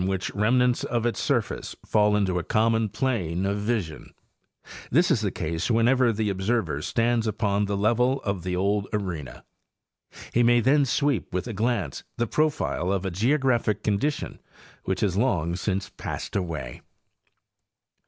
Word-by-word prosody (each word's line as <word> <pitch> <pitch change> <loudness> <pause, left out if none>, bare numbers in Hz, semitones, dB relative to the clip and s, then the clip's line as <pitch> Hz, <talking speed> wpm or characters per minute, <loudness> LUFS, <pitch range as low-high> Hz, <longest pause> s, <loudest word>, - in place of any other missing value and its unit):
which 95 -1 -2
remnants 125 +4 +2
of 120 -2 -1
its 120 -4 0
surface - - -1
fall 105 0 +3
into 95 -3 +1
a - - -4
common 110 +3 +1
plane 95 -9 -1
of 100 +1 -1
vision. 100 -8 -3 0.7
This 170 +7 +3
is 115 - +2
the 105 - 0
case 85 +1 -3
whenever 120 +2 +3
the 110 0 -1
observer 95 -6 -1
stands 115 +4 +1
upon 105 -1 0
the 100 0 -2
level 120 +6 +2
of 100 -3 -2
the 90 +1 -2
old 100 +2 0
arena. 85 -11 -4 0.9
He 120 - +3
may 120 0 +5
then 140 +4 +4
sweep 135 - 0
with 90 - -2
a 120 - -4
glance 105 - -1
the 120 - +1
profile 145 -9 0
of 100 -1 -1
a 95 - -1
geographic 120 - +1
condition 110 +8 -1 0.5
which 95 0 -1
has 95 -3 +1
long 90 -8 +1
since 95 +1 -2
passed - - -6
away. 80 -10 -4
105 Hz, 155 wpm, -25 LUFS, 95-120 Hz, 0.9 s, may